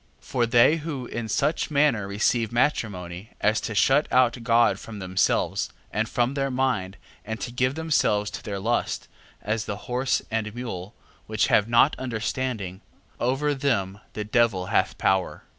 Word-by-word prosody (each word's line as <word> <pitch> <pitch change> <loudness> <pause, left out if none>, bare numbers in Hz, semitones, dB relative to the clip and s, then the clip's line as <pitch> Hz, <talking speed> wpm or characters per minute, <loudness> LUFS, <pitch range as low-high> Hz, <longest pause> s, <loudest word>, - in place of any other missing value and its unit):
6:17. - - -30
For 120 -2 +1
they 120 +7 +5
who 150 -5 -5
in 120 -1 -5
such 150 +11 0
manner 140 -9 +2
receive 110 +3 +1
matrimony, 105 -6 -1
as 110 +1 +2
to 110 - -4
shut 135 +8 +4
out 125 -2 +4
God 115 0 +3
from 110 -2 -9
themselves, 95 -2 0 0.2
and 110 +3 -1
from 120 +2 +1
their 135 -1 -1
mind, 125 -8 -1 0.3
and 110 +1 -5
to 120 - -4
give 130 +2 0
themselves 145 -10 +1
to - - -6
their 100 -2 -4
lust, 115 +5 -1 0.4
as 110 0 -1
the 100 - -4
horse 125 0 0
and 110 -1 -2
mule, 110 -5 -6 0.3
which 110 0 +1
have 105 +2 +4
not 120 +5 +5
understanding, 115 -5 -3 0.4
over 135 +4 +1
them 100 -9 -1
the 105 - -3
devil 105 -4 +2
hath - - +2
power. 95 -1 0
115 Hz, 160 wpm, -25 LUFS, 105-130 Hz, 0.4 s, they